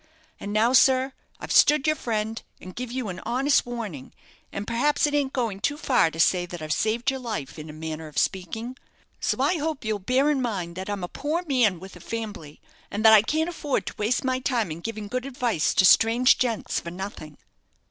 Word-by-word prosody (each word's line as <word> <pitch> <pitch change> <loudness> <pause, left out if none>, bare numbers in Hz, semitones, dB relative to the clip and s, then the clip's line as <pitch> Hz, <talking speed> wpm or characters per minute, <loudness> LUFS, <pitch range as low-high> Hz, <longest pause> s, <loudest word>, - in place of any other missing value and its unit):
And 200 - -6
now, 220 +4 +2
sir, 265 +1 +4 0.3
I've - - -7
stood 295 -2 +5
your 310 0 +3
friend, 220 -3 -3 0.2
and 185 0 -11
give 250 -1 -5
you 255 -2 -3
a 180 - -8
honest 270 +2 +2
warning; 215 - -6 0.4
and 200 - -5
perhaps 245 +8 +1
it 295 - -1
ain't 285 -2 +1
going 230 -7 -2
too 285 +8 -1
far 255 - +2
to 160 - -10
say 175 +1 +3
that 175 0 -7
I've 155 -1 -2
saved 230 - 0
your 265 - -5
life, 165 - -5
in 155 +1 -8
a - - -8
manner 160 0 -6
of 150 -1 -13
speaking. 220 - -2 0.4
So - - -1
I 355 - +2
hope 305 -4 -3
you'll 215 -1 -1
bear 260 +9 +2
in 275 -3 0
mind 190 -8 -3
that 190 +2 -6
I'm 200 -3 -3
a - - -2
poor 310 - -3
man 240 - +2
with 190 +1 -11
a - - -12
fambly, 210 -10 -6 0.3
and 210 +2 -3
that 220 - +9
I 215 - +8
can't 315 +8 0
afford 300 -5 -2
to - - -6
waste 220 +4 0
my 255 -1 0
time 240 -8 -1
in 155 - -6
giving 215 +2 -5
good 255 +5 -3
advice 245 - 0
to 190 - +5
strange 230 +6 +5
gents 235 -4 -1
for 170 - -7
nothing." 175 -5 -8
225 Hz, 220 wpm, -25 LUFS, 185-260 Hz, 0.4 s, that